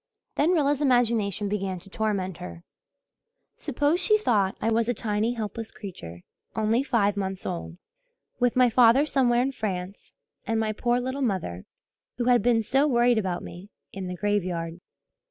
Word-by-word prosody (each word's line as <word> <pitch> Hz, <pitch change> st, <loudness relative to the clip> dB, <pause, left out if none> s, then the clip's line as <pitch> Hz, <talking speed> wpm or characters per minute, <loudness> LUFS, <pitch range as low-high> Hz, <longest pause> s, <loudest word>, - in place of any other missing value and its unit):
Then 300 Hz, -, +2 dB
Rilla's 290 Hz, -4 st, +2 dB
imagination 230 Hz, -7 st, +1 dB
began 195 Hz, -2 st, -2 dB
to 175 Hz, -, -12 dB
torment 195 Hz, -4 st, -2 dB
her. 175 Hz, -1 st, -9 dB, 0.9 s
Suppose, 290 Hz, +4 st, 0 dB
she 425 Hz, +3 st, +4 dB
thought, 205 Hz, -, +1 dB
I 225 Hz, -, 0 dB
was 230 Hz, +1 st, +1 dB
a 245 Hz, -, 0 dB
tiny, 215 Hz, +2 st, -1 dB
helpless 225 Hz, 0 st, -5 dB
creature 175 Hz, -, -9 dB, 0.3 s
only 220 Hz, +2 st, +2 dB
five 225 Hz, -7 st, +1 dB
months 190 Hz, -1 st, -4 dB
old, 175 Hz, -1 st, -5 dB, 0.6 s
with 245 Hz, -1 st, +2 dB
my 255 Hz, 0 st, +5 dB
father 245 Hz, +4 st, +5 dB
somewhere 245 Hz, -4 st, +2 dB
in 270 Hz, -, -1 dB
France 195 Hz, -5 st, -5 dB, 0.3 s
and 225 Hz, 0 st, 0 dB
my 215 Hz, -1 st, 0 dB
poor 240 Hz, +3 st, 0 dB
little 260 Hz, +3 st, -3 dB
mother, 185 Hz, -, -2 dB, 0.5 s
who 245 Hz, -, -1 dB
had 245 Hz, -2 st, +4 dB
been 230 Hz, 0 st, +2 dB
so 270 Hz, +6 st, +2 dB
worried 240 Hz, -3 st, +3 dB
about 185 Hz, -4 st, -3 dB
me, 185 Hz, +4 st, -10 dB, 0.2 s
in 190 Hz, -1 st, -5 dB
the 180 Hz, -, -4 dB
graveyard. 180 Hz, -4 st, -2 dB
220 Hz, 160 wpm, -26 LUFS, 190-245 Hz, 0.9 s, my